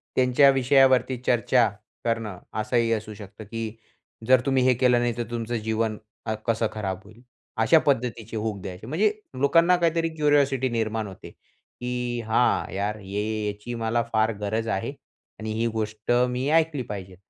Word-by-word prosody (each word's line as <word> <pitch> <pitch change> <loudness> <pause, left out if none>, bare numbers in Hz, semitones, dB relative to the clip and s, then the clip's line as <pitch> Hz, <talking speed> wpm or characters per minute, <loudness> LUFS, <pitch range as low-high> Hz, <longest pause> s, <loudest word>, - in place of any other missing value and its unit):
त्यांच्या 130 +2 +5
विषयावरती 130 -1 +4
चर्चा 120 -1 +3 0.3
करणं 115 -5 -2 0.2
असंही 115 0 +1
असू 110 -1 -4
शकतं, 105 +1 -11
की 115 +1 -5 0.5
जर 130 -1 +6
तुम्ही 135 -2 +2
हे 130 0 +5
केलं 125 0 +3
नाही 120 -1 -1
तर 120 - -1
तुमचं 120 0 -3
अ, - - +1
जीवन 110 -1 -1 0.5
कसं 115 -1 +1
खराब 95 -3 -3
होईल. 110 +4 -17 0.4
अशा 135 +9 +5
पद्धतीचे 115 -5 -1
हूक 105 -2 -3
द्यायचे 95 +3 -8
म्हणजे 200 +9 +2 0.3
लोकांना 165 +6 +5
काहीतरी 165 -1 +1
क्युरिओसिटी 140 -4 +2
निर्माण 110 -2 -1
होते, 95 - -11
की 125 -1 -6
"हां, 120 +2 +2
यार 105 +2 -2
हे 100 0 -4 0.3
याची 105 +4 -5
मला 115 +1 0
फार 110 +1 +3
गरज 110 +2 -1
आहे 95 -3 -2 0.5
आणि 110 0 -4
ही 115 +1 0
गोष्ट 110 0 -3 0.2
मी 125 +3 -1
ऐकली 160 -3 +2
पाहिजे." 95 -3 -6
115 Hz, 155 wpm, -25 LUFS, 110-130 Hz, 0.5 s, जर